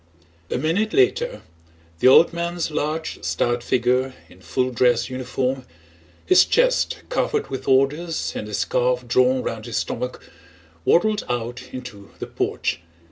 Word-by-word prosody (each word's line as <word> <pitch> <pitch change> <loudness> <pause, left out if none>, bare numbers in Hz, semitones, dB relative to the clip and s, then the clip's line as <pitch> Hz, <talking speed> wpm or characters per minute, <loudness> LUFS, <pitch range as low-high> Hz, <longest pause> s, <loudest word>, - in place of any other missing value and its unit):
A - - -1
minute 175 - 0
later 460 +5 +1 0.6
the - - +4
old 165 +6 +7
man's 170 -1 -2
large 155 +2 -3
stout 120 0 0
figure 125 +2 +1
in 90 - -18
full 130 +6 -1
dress 120 0 +2
uniform, 130 +1 -2 0.6
his 370 - +6
chest - - +1
covered 450 -3 -1
with 135 - -5
orders 150 +5 +1
and 105 - -5
a 105 - -3
scarf 125 +4 0
drawn 130 +1 +3
round 110 -1 -5
his 115 - -3
stomach, 125 +2 -3 0.7
waddled 210 +4 +3
out 120 +1 -4
into 120 -6 -9
the - - -5
porch. - - -2
130 Hz, 135 wpm, -22 LUFS, 120-170 Hz, 0.7 s, old